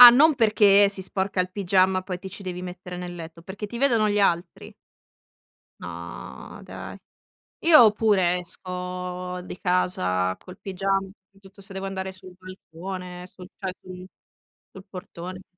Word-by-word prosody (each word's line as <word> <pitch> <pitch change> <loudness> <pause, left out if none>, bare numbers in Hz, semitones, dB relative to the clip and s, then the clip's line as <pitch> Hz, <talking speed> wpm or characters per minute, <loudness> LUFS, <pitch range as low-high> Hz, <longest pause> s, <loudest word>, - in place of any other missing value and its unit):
Ah 245 -1 +15
non 290 +5 +6
perché 205 -4 +6
si 200 - -3
sporca 190 0 -1
il 180 - 0
pigiama 185 -1 +3
poi 185 -1 -4
ti 190 - -8
ci 195 +1 -9
devi 180 -1 -5
mettere 180 0 -7
nel 175 -1 -6
letto, 165 0 -9
perché 195 +4 -6
ti 235 +3 -6
vedono 235 -6 +3
gli 205 - +1
altri. 175 -2 0 1.1
No - - -8
dai. - - -8 0.6
Io 250 -10 +8
pure 190 -5 +3
esco 180 0 -5
di 180 - -8
casa 95 - +1
col 185 +1 -13
pigiama, 195 0 0 0.2
soprattutto 195 +1 -19
se 195 0 -8
devo 195 0 -4
andare 190 0 -4
sul 185 -1 -11
balcone, 180 0 -8
sul 180 -1 -13
cioè 190 -2 -4
sul 185 0 -10 0.7
sul 190 0 -11
portone. 185 0 -8
185 Hz, 150 wpm, -25 LUFS, 180-195 Hz, 1.1 s, Ah